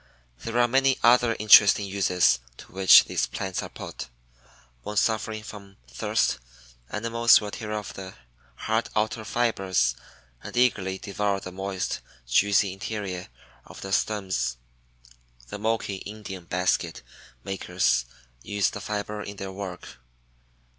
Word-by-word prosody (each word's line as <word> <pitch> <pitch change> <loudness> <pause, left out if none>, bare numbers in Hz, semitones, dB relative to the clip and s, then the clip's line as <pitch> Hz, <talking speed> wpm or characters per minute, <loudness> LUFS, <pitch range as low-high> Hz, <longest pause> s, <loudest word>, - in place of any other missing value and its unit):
There 115 +1 -4
are 120 0 +4
many 135 +2 +3
other 120 -1 +5
interesting 105 -1 +7
uses 90 -8 +2 0.2
to - - -14
which 95 0 +8
these - - -1
plants 95 -1 -4
are - - -7
put. - - -8 0.7
When 105 +11 -6
suffering 110 0 0
from 100 -2 -11
thirst - - 0 0.5
animals 115 +2 +4
will 105 -1 -6
tear 110 -1 -6
off 105 -1 -5
the 95 0 -9 0.4
hard 110 - -1
outer 110 +1 0
fibers 95 - +1 0.5
and - - -8
eagerly 95 -7 +2
devour 100 -1 -2
the 95 - -8
moist, 95 0 -3 0.3
juicy 100 - +3
interior 95 -2 -5 0.4
of - - -12
the 95 - -6
stems. 95 - -1 0.9
The 105 - -6
Moki 110 -2 -1
Indian 100 -3 -8
basket 90 -8 -1 0.4
makers 90 -9 0 0.4
use 100 +5 0
the 105 - -7
fiber 105 +1 -4
in 100 0 -7
their 95 0 -6
work. 95 -7 -8
100 Hz, 130 wpm, -26 LUFS, 95-110 Hz, 0.9 s, which